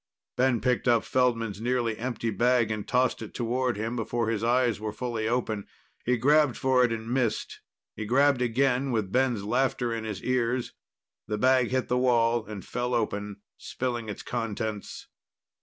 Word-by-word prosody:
Ben 125 -2 +2
picked 125 +1 0
up 120 -2 +4
Feldman's 115 -5 0
nearly 120 -2 0
empty 115 -1 -3
bag 120 +1 +2
and 105 -1 -4
tossed 125 -1 +1
it 110 - -8
toward 125 0 -1
him, 110 +3 -3
before 115 0 -1
his 110 -1 -1
eyes 120 -2 +2
were 110 0 -3
fully 115 -1 -3
open. 110 -4 -1 0.4
He 125 0 +1
grabbed 145 +1 +3
for 130 -1 +3
it 120 - +2
and 115 -1 -4
missed. 120 -3 -1 0.3
He 110 - -5
grabbed 135 +2 +3
again, 130 +2 +1
with 110 -5 -1
Ben's 125 -4 +1
laughter 120 +1 0
in 115 -1 -3
his 105 -3 -5
ears. 125 -1 0 0.5
The 105 - -2
bag 130 +1 +4
hit 130 +1 -1
the 125 0 +1
wall 120 -2 +3
and 105 -3 -7
fell 125 0 -2
open, 105 -3 -2 0.2
spilling 120 -3 -3
its 105 - -6
contents. 110 -3 -4
120 Hz, 170 wpm, -27 LUFS, 110-125 Hz, 0.5 s, up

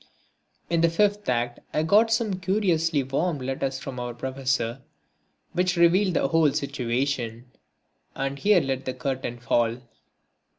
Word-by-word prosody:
In 170 -1 +1
the 170 - +4
fifth 205 +2 +1
act 120 -1 -1 0.2
I 155 - +2
got 215 +7 +4
some 220 -4 0
curiously 175 -6 +1
warm 150 +5 -1
letters 135 0 -3
from 135 -2 -7
our 120 -1 -5
Professor 130 -1 -2 0.7
which 180 0 +1
revealed 180 +2 +4
the 135 - +1
whole 160 -1 +4
situation. 125 -2 -2 0.6
And 135 +1 -3
here 200 0 +4
let 135 0 -3
the 130 - -3
curtain 130 -1 -3
fall. 120 -1 +1
135 Hz, 135 wpm, -25 LUFS, 130-175 Hz, 0.7 s, the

